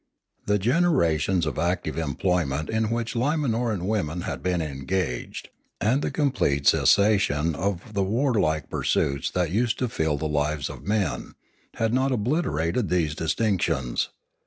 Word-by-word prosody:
The 105 0 +3
generations 95 - +2
of - - -3
active 90 +3 -1
employment 80 -1 -1
in 110 -1 0
.which 115 0 -2
Limanoran 120 - 0
women 90 -5 -1
had - - -4
been 90 -1 0
en 70 -4 -5
gaged, 90 -9 -3 0.3
and 125 +8 +2
the - - -1
complete 125 - 0
cessation 95 -7 +3
of 100 +5 -3
the 100 - 0
warlike 95 - +1
pur - - -2
suits 70 0 0
that 90 -3 -1
used 115 +3 +1
to 125 - 0
fill 80 -9 -1
the 80 - -2
lives 75 0 -1
of - - -10
the - - -7
men, 105 -5 -1 0.4
had 115 0 0
not 130 +2 +2
obliterated 115 - 0
these 85 -4 +1
distinctions. 80 - 0
95 Hz, 150 wpm, -25 LUFS, 80-115 Hz, 0.4 s, The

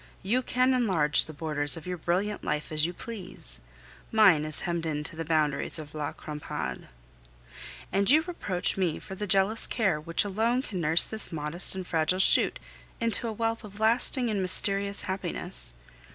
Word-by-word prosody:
You 235 +7 +1
can 255 +1 +2
enlarge 185 -12 +2
the - - -9
borders 150 0 -1
of 160 - -10
your 180 0 -3
brilliant 190 +6 -1
life 150 +1 -3
as 155 +1 +1
you - - -4
please; 185 - -4 0.5
mine 195 -9 +5
is 155 -2 +1
hemmed 170 -1 -2
in 150 -1 -2
to 165 - -4
the 165 - -4
boundaries 155 -2 +1
of 155 -2 -9
La 150 -2 -3
Crampade. 150 -1 -6 1.0
And 200 +1 +1
you 310 +4 +6
reproach 205 - -1
me 180 -5 0
for - - -10
the 210 +2 -4
jealous 195 +4 +2
care 195 -10 0
which 165 +5 0
alone 225 +6 0
can 185 -8 -5
nurse 160 +2 +5
this 220 -3 -2
modest 160 +4 0
and 185 -1 -5
fragile 165 +1 +1
shoot 190 - +5 0.4
into 230 0 +1
a - - -2
wealth 225 +1 -2
of 205 -1 -11
lasting 240 +3 +3
and 200 -2 -1
mysterious 200 +2 0
happiness! 185 - -3
185 Hz, 175 wpm, -28 LUFS, 155-215 Hz, 1.0 s, you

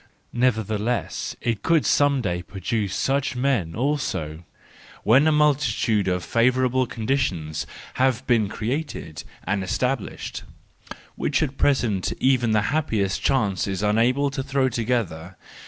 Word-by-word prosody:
Nevertheless 115 -1 -1
it 115 -3 -1
could 165 -3 +2
some 145 -2 +3
day 90 -3 -1
produce 100 +2 -3
such 140 0 0
men 125 -11 0
also—when 120 - -1
a - - +5
multitude 130 -9 +2
of 90 -1 0
favourable 130 +2 +2
conditions 100 - -2 0.3
have 130 -1 +2
been 110 -5 +2
created 115 - -4 0.2
and 95 +1 -1
established, 125 +5 -2 0.7
which - - 0
at 140 -2 -3
present 120 -11 +1
even 130 -3 +3
the 110 -1 +3
happiest 110 -11 0
chance 105 -9 +1
is 95 0 -3
unable 120 +7 +2
to 135 -1 -3
throw 135 -1 +1
together. 110 -8 -2
120 Hz, 120 wpm, -24 LUFS, 100-135 Hz, 0.7 s, a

